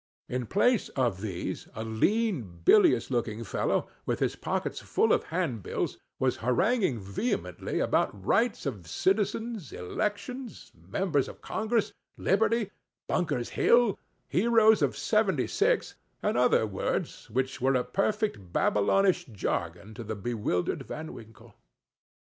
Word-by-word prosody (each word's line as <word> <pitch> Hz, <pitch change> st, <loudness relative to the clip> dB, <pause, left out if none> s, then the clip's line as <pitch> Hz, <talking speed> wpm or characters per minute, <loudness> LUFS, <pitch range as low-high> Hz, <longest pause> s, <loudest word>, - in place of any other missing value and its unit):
In 125 Hz, -2 st, -3 dB
place 225 Hz, +3 st, +2 dB
of 120 Hz, -8 st, +1 dB
these, 95 Hz, -5 st, -4 dB
a 110 Hz, -, -4 dB
lean, 115 Hz, -, 0 dB
bilious 210 Hz, -9 st, +5 dB
looking 115 Hz, -2 st, -1 dB
fellow, 110 Hz, -, 0 dB, 0.2 s
with -, -, +1 dB
his -, -, 0 dB
pockets -, -, -2 dB
full -, -, +2 dB
of -, -, +1 dB
handbills, 155 Hz, -, -2 dB, 0.2 s
was 130 Hz, -1 st, +1 dB
haranguing 165 Hz, -, +1 dB
vehemently 100 Hz, -, -2 dB
about 95 Hz, -2 st, 0 dB
rights 230 Hz, -, +2 dB
of 105 Hz, -, -4 dB
citizens—elections—members 205 Hz, -, -2 dB
of -, -, -11 dB
congress—liberty—Bunker's 215 Hz, -, -1 dB
Hill—heroes 225 Hz, -1 st, +3 dB
of -, -, +1 dB
seventy -, -, +2 dB
six—and 425 Hz, -, -1 dB
other 125 Hz, -2 st, +4 dB
words, 100 Hz, -3 st, -3 dB
which 130 Hz, +3 st, -2 dB
were 135 Hz, +1 st, +3 dB
a 125 Hz, -, +2 dB
perfect 195 Hz, -, -1 dB
Babylonish 180 Hz, -, +2 dB
jargon 95 Hz, -, -3 dB
to 120 Hz, -, -7 dB
the 110 Hz, 0 st, -4 dB
bewildered 105 Hz, -4 st, -1 dB
Van 155 Hz, +1 st, -6 dB
Winkle. 115 Hz, 0 st, -13 dB
135 Hz, 110 wpm, -29 LUFS, -, 0.2 s, bilious